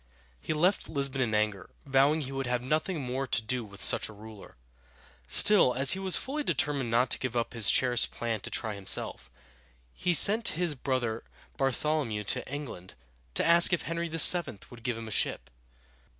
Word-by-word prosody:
He - - -6
left 175 +6 0
Lisbon 140 -3 -2
in 110 -4 -1
anger, 105 -3 -2 0.2
vowing 140 +3 +2
he 135 -2 -6
would 135 -1 -4
have 125 0 -2
nothing 155 +6 -2
more 130 0 -4
to - - 0
do 120 +2 -4
with 100 -2 -10
such - - -1
a - - -11
ruler. 105 - -14 0.7
Still, 155 - +5
as 135 +2 +6
he 190 - +2
was 190 -1 0
fully 295 +3 -4
determined 140 - -1
not 120 +2 +1
to - - +2
give 125 -2 -4
up 115 - -3
his 115 -4 +1
cherished 125 -2 +2
plan 115 -2 -4
to - - -9
try 110 -2 -4
himself, 100 -2 -5 0.6
he 175 - 0
sent 215 0 +6
his 175 -3 0
brother 125 -4 -3 0.3
Bar 135 -1 0
thol´o 150 +2 -2
mew 105 -1 -5
to 105 - -4
England 135 -11 -8 0.4
to - - +1
ask 170 +2 +6
if 175 - 0
Henry 170 0 -4
VII. 165 - +4
would 120 -1 -13
give 120 0 -4
him 115 -1 -8
a - - -9
ship. 65 - -1
130 Hz, 195 wpm, -28 LUFS, 115-155 Hz, 0.7 s, as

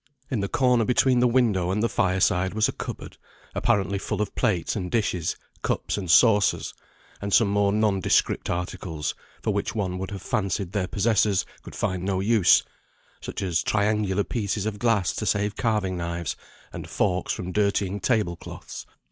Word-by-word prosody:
In 125 - 0
the 100 - -1
corner 125 -3 +3
between 125 +2 +3
the 125 - +4
window 115 -8 +2
and 105 +4 0
the - - +3
fire 95 -3 +1
side 95 0 +1
was 110 0 +3
a - - -1
cupboard, - - -7 0.4
apparently 100 0 +1
full 105 +1 -3
of 105 -2 -2
plates 90 -6 0
and 90 -4 -3
dishes, 90 -7 0 0.3
cups - - -1
and 95 -4 -5
saucers, 105 +2 +4 0.5
and 100 0 -3
some 110 0 +4
more 100 0 +2
nondescript 105 -3 +1
articles, 85 -3 -3 0.3
for - - 0
which - - -2
one 95 -4 -2
would 95 - -4
have 100 -2 -7
fancied 100 -2 -1
their 100 -3 -1
possessors 105 -2 +2 0.2
could - - -11
find 95 -1 -1
no 95 0 -1
use 105 -1 +4 0.6
such - - -5
as 85 -3 +1
triangular 105 -2 +1
pieces 105 -3 -2
of 105 -1 -3
glass 115 -6 +2
to 110 - -3
save 100 +3 0
carving 105 -6 0
knives 85 -2 -3 0.4
and - - -7
forks 90 +1 0
from 90 0 -4
dirtying 100 -1 0
table 105 -8 +1
cloths. - - -9
100 Hz, 175 wpm, -25 LUFS, 95-110 Hz, 0.6 s, the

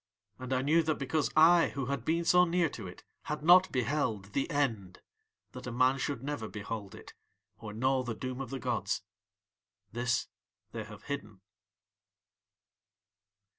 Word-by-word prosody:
"And 130 0 -7
I 130 0 +1
knew 160 +4 +4
that 155 -1 0
because 140 +2 0
I 165 +2 +6
who 135 -2 -2
had 140 -2 -3
been 170 +1 +1
so 180 +2 +6
near 175 -1 +2
to - - -8
it - - -11 0.2
had 150 0 -4
not 180 +3 +7
beheld 120 -6 -1
THE 140 - 0
END 115 - -1 0.5
that 125 -1 -9
a - - -3
man 130 +3 +3
should 135 -2 -3
never 145 -6 -3
behold 105 -1 -6
it - - -12 0.5
or 110 -2 -7
know 130 +4 +1
the 120 -3 -4
doom 130 +3 -5
of 130 - -6
the 135 - -4
gods. 110 -7 -2 0.9
This 120 0 0 0.4
They 115 -2 -5
have 105 -1 -12
hidden." 110 -9 -6
130 Hz, 160 wpm, -31 LUFS, 115-150 Hz, 0.9 s, not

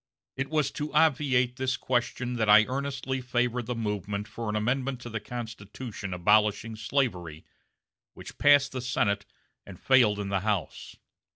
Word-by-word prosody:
It 135 +1 -3
was 155 -2 0
to 150 +1 -5
obviate 135 -5 +2
this 130 -2 -1
question 125 0 -1
that 110 -2 0
I 105 +1 +8
earnestly 135 0 -3
favored 125 -1 -1
the 125 - -2
movement 105 -2 -3
for 115 +1 -5
an 105 - -2
amendment 125 +4 -1
to 120 - -8
the 115 - -3
Constitution 110 -2 -7
abolishing 105 +4 +2
slavery, 105 - -2 0.7
which - - -11
passed 145 -1 +5
the 130 - -4
Senate 100 -5 0 0.4
and 95 -3 -12
failed 120 -6 +4
in 100 -1 -4
the 100 -1 +1
House. 105 -2 -3
120 Hz, 155 wpm, -28 LUFS, 105-130 Hz, 0.7 s, I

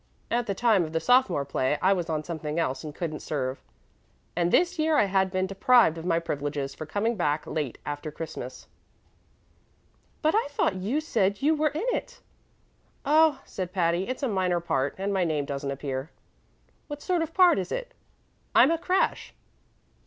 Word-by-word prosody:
At 235 0 0
the 200 - -1
time 220 -4 +3
of 160 0 -6
the 165 - +1
sophomore 190 - +3
play 140 +1 0
I 190 +1 +4
was 175 -3 -3
on 155 -1 -1
something 155 -2 -4
else 135 -6 -1
and 150 -1 -7
couldn't 155 -3 -4
serve, 130 -3 -3 0.7
and 175 0 +1
this 355 -1 +2
year 310 0 +3
I - - +5
had 190 -1 +2
just 190 - -10
been 185 0 +1
deprived 195 -1 +4
of 165 - -8
my 165 -2 +2
privileges 145 -4 -3
for 155 - -8
coming 220 +8 0
back 150 -5 0
late 150 -6 -3
after 145 +1 -4
Christmas." 135 -5 -7 1.6
"But 310 - +3
I 440 - +2
thought 250 -9 0
you 220 +12 -1
said 205 -8 0
you 305 +2 +4
were 305 0 +2
in 310 +9 -3
it?" - - -6 0.9
"Oh," 305 0 +4
said 185 -1 -5
Patty, 175 0 +1
"it's 255 +3 -4
a - - +2
minor 185 -5 +1
part, 140 -5 -1
and 195 +1 -2
my 190 -2 +2
name 155 -4 0
doesn't 140 0 -4
appear." 135 +1 -4 0.8
"What 290 -1 -7
sort 360 -2 +1
of 325 - -2
a - - -27
part 360 - +5
is 185 -1 -4
it?" - - -4 0.6
"I'm 275 - +7
a 330 - +1
crash." 370 +2 0
185 Hz, 190 wpm, -27 LUFS, 155-255 Hz, 1.6 s, I'm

